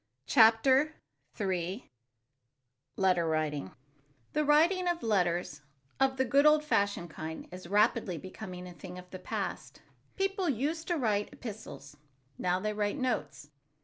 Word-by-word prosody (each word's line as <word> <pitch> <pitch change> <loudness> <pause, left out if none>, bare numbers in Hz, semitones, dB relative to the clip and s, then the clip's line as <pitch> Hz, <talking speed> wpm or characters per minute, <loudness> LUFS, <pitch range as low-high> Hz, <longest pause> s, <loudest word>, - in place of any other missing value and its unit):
CHAPTER 260 +6 +5 0.4
III 190 +2 -2 1.1
LETTER 180 -3 +2
WRITING 150 -8 -1 0.6
THE 305 - +2
writing 335 +5 +4
of 345 -1 -1
letters, 175 -7 0 0.4
of 265 0 +2
the 260 - +2
good 280 +4 +4
old 300 0 +5
fashioned 200 - 0
kind, 160 +1 -7
is 180 -1 -9
rapidly 210 -2 +2
becoming 185 +1 -8
a 180 - -9
thing 180 0 -10
of 180 0 -12
the 185 - -7
past. - - -5 0.3
People 390 -2 0
used 295 +6 -1
to 345 - 0
write 210 -6 0
epistles. 200 - -9 0.4
Now 180 0 +1
they 210 +2 -2
write 210 +3 -1
notes. 235 - -3
210 Hz, 135 wpm, -31 LUFS, 180-275 Hz, 1.1 s, CHAPTER